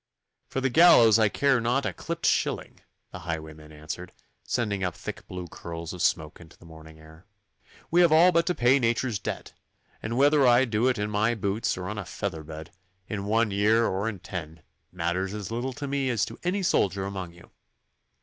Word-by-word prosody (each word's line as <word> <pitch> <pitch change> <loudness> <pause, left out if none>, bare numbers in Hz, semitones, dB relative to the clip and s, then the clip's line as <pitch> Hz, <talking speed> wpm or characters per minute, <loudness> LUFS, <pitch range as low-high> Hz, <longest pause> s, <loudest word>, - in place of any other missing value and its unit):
'For 135 - -3
the 135 -1 0
gallows 120 -8 +7
I 110 -2 +4
care 135 +2 +2
not 125 +4 0
a - - -2
clipped 170 0 -5
shilling,' - - 0 0.3
the - - -8
highwayman 80 -2 -7
answered, 75 0 -8 0.3
sending 105 -5 -2
up 90 -2 -2
thick - - -8
blue 90 -1 -6
curls 85 0 -7
of 90 - -7
smoke 80 -2 0
into 85 -1 -16
the - - -18
morning 80 -1 -13
air. 80 +4 -17 0.6
'We 175 +2 +5
have 170 -3 +5
all 170 +3 +6
to 170 +2 +2
pay 125 +3 +4
nature's 115 -2 0
debt, - - -6 0.5
and 115 +2 -3
whether 145 0 +5
I 120 +2 +5
do 115 +1 +1
it 130 - +1
in 105 +1 -2
my 110 +3 +1
boots 100 +1 -1
or 90 0 -5
on 105 +2 -4
a 95 - -6
feather 80 - -4
bed, 80 +1 -9 0.4
in 100 -2 -4
one 110 +1 +1
year 110 +3 +3
or 100 +3 -1
in 105 - -6
ten, 80 -3 -8 0.3
matters 90 +3 -2
as 105 -1 -6
little 125 +3 -3
to 145 - -6
me 140 -1 -1
as 120 -4 +1
to - - -10
any 190 +3 -1
soldier 95 - +1
among 95 -3 -6
you. 85 - -18
105 Hz, 200 wpm, -26 LUFS, 85-125 Hz, 0.6 s, gallows